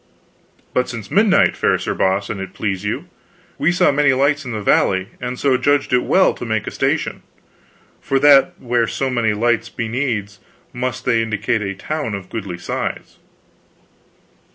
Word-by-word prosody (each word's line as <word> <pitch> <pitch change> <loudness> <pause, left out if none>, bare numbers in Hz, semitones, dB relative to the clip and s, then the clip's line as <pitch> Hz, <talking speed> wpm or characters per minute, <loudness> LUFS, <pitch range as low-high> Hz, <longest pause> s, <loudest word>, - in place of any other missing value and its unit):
"But 125 - 0
since 115 -4 -7
midnight, 205 -1 +4
fair - - +2
Sir - - -3
Boss, 95 +1 0
an 100 - -5
it 95 -1 -7
please 95 -3 -2
you. 105 - -3 0.5
We 170 - +3
saw 175 - +3
many 145 -1 +3
lights 140 +2 +1
in 125 - -5
the 110 - -3
valley, 95 -1 +2
and 125 0 -4
so 135 -1 +2
judged 145 0 +1
it 125 - +4
well 190 - +3
to - - -9
make 110 -3 -1
a - - -4
station, - - -1 0.8
for 135 - 0
that 140 -1 +6
where 120 -1 0
so 135 -1 -2
many 115 -4 +1
lights 115 +1 +1
be 115 - -4
needs 110 -5 -2 0.3
must 130 +1 -3
they 115 -2 +2
indicate 110 0 -1
a 100 -1 -3
town 145 -1 -3
of 95 -2 -9
goodly 100 -6 -5
size." - - -5
120 Hz, 175 wpm, -19 LUFS, 105-135 Hz, 0.8 s, that